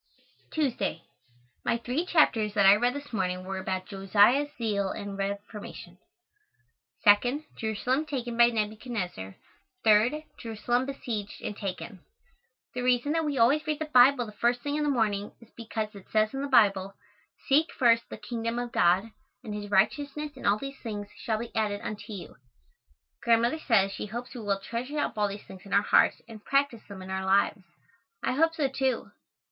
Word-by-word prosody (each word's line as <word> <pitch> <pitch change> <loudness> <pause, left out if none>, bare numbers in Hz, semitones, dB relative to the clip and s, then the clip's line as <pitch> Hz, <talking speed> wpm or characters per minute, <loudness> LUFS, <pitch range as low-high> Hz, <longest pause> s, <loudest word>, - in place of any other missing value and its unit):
Tuesday. 260 - -1 0.6
My 235 - +1
three 255 +9 -2
chapters 225 - +3
that 200 - +4
I 195 +1 +9
read 245 +4 +1
this 285 -3 -8
morning 185 -3 -1
were 190 0 -4
about 185 0 -3
Josiah's 205 +8 +3
zeal 205 -4 -1
and 200 -1 -5
reformation; 200 -2 -6 1.1
2nd, 245 +8 +4
Jerusalem 250 +7 -1
taken 245 -5 -3
by 235 0 +7
Nebuchadnezzar; 210 - -3 0.5
3rd, 225 +8 +4 0.2
Jerusalem 240 +3 -1
besieged 225 -7 -5
and 210 - -4
taken. 195 0 -6 0.7
The 250 - -3
reason 250 +3 +2
that 325 0 +1
we 290 -2 -1
always 275 +7 +3
read 305 -1 0
the 310 0 -5
Bible 250 0 +6
the 215 - -9
first 240 +3 0
thing 290 +2 -2
in 300 - 0
the 295 - +1
morning 210 -6 0
is 230 -1 -18
because 220 -2 -4
it 200 -2 -13
says 215 +1 +2
in 270 - -3
the 280 - -2
Bible, 195 -6 +3 0.5
"Seek 305 +4 +3
first 235 -2 +3
the - - -7
kingdom 230 -1 -4
of 240 0 -3
God 185 +5 +3 0.3
and 215 - -6
His 205 0 -5
righteousness 285 +9 +1
and - - -4
all 200 - +4
these 275 +3 -7
things 205 -3 -5
shall 220 -3 -2
be 230 +1 -7
added 210 -2 0
unto 215 +1 -6
you." 195 -4 -8 0.8
Grandmother 235 +5 +2
says 200 -9 +3
she 205 - -5
hopes 240 +4 -6
we 245 - -7
will 200 -2 -1
treasure 240 +8 -5
up - - -1
all 210 -1 +1
these 200 +1 -7
things 190 - -12
in 200 - -8
our 200 - +4
hearts - - +3
and 220 -2 -11
practice 275 -5 +1
them 195 -2 -8
in 190 - -8
our 190 0 -2
lives. 195 +1 +2 0.6
I - - +1
hope 325 +5 +2
so, 295 -4 +1
too. 265 -2 -1
225 Hz, 180 wpm, -28 LUFS, 200-260 Hz, 1.1 s, I